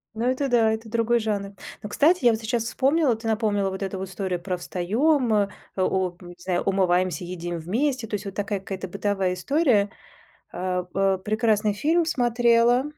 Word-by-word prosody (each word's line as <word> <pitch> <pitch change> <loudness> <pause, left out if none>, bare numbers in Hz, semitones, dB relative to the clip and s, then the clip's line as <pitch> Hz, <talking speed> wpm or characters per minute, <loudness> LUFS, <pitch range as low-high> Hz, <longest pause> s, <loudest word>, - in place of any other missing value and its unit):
Ну 225 +2 -2
это 260 +2 0
да, 230 -3 +4
это 220 0 -6
другой 235 +1 +2
жанр. 205 -3 -2 0.3
Но, 210 - -5
кстати, 305 +5 +3
я 240 - +7
вот 220 - -1
сейчас 225 +1 -1
вспомнила, 270 +2 +2
ты 225 +1 -7
напомнила 210 -3 +1
вот 190 +1 -5
эту 195 0 -4
вот 190 0 -5
историю 190 -2 -3
про 180 0 -3
"встаём, 230 - +1
э, 205 -2 +2 0.3
олп 185 -1 0
не 175 -1 -11
знаю, 175 0 -1
умываемся, 185 -3 +1
едим 175 -1 -5
вместе", 240 - -1
то 210 - -3
есть 205 0 -6
вот 195 - -5
такая 205 0 -2
какая-то 190 0 -6
бытовая 195 0 -1
история. 220 - +2 0.6
Э, 180 0 -2
э, 195 0 +2
прекрасный 215 -1 +1
фильм 320 +11 +1
смотрела, 240 -3 +3
210 Hz, 180 wpm, -24 LUFS, 190-240 Hz, 0.6 s, я